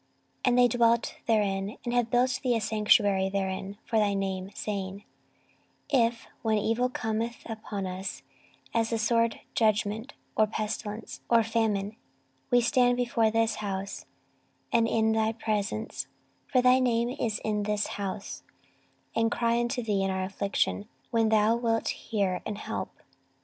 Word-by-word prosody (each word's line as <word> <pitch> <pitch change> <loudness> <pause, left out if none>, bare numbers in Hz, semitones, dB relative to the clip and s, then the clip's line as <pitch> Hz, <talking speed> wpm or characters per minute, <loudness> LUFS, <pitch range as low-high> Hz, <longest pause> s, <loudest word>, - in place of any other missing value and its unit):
14:020:008 - - -42 0.4
And 245 - +3
they 245 0 +7
dwelt 235 0 +2
therein, 200 -2 +1
and 240 - -1
have 245 -1 +2
built 250 +1 +2
thee 250 -2 +2
a - - +2
sanctuary 210 -2 +3
therein 195 0 -3
for 225 - 0
thy 205 -1 +2
name, 190 -1 -2
saying, 200 -1 -4 0.9
14:020:009 240 -4 +6
If, 230 0 -9
when 220 -1 +2
evil 225 +4 +1
cometh 225 0 -2
upon 215 -3 -5
us, 185 +2 -5 0.5
as 225 -1 +1
the 230 - 0
sword, 230 +1 +1
judgment, 215 +3 +1 0.2
or 215 - +4
pestilence, 215 0 -4
or 230 -1 +5
famine, 220 -2 0 0.5
we 245 0 +5
stand 245 0 +3
before 235 -2 +2
this 225 0 +1
house, 200 -1 -4 0.7
and 230 -1 +4
in 220 -1 +2
thy 220 0 +1
presence, 200 - -2 0.4
(for 255 -2 +2
thy 250 +1 +6
name 240 -2 +2
is 235 -4 -1
in 210 -1 0
this 210 0 0 0.2
house,) 195 0 -4 0.7
and 225 0 +3
cry 235 0 +1
unto 240 +1 -1
thee 205 -3 0
in 195 - +1
our 190 0 -1
affliction, 200 +2 -1 0.2
then 225 -1 +3
thou 220 +1 +4
wilt 230 -1 0
hear 195 -5 -1
and 210 -2 -4
help. - - -4
220 Hz, 155 wpm, -28 LUFS, 200-235 Hz, 0.9 s, they